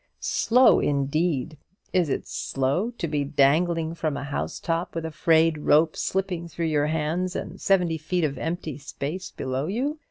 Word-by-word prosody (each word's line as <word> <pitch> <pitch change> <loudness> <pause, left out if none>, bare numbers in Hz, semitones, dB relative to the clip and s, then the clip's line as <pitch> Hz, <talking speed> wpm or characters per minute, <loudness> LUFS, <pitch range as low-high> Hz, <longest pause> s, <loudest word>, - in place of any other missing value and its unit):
Slow, 250 +3 +4
indeed! 145 +1 0 0.3
Is 180 -5 +2
it - - -2
slow 135 - -1
to 170 - -2
be 150 -2 0
dangling 160 +4 +2
from 155 -3 -2
a - - -4
housetop 165 +4 -3
with 165 -1 -3
a 160 - -4
frayed 160 -1 +3
rope 155 +2 +3
slipping 185 -3 -2
through 170 0 -4
your 145 0 +2
hands 160 +4 -1
and 180 +3 -6
seventy 180 -4 +2
feet 175 +3 -1
of 145 -3 -1
empty 160 -3 -4
space 155 +6 -5
below 130 +3 -3
you? 270 - -2
160 Hz, 160 wpm, -25 LUFS, 150-180 Hz, 0.3 s, Slow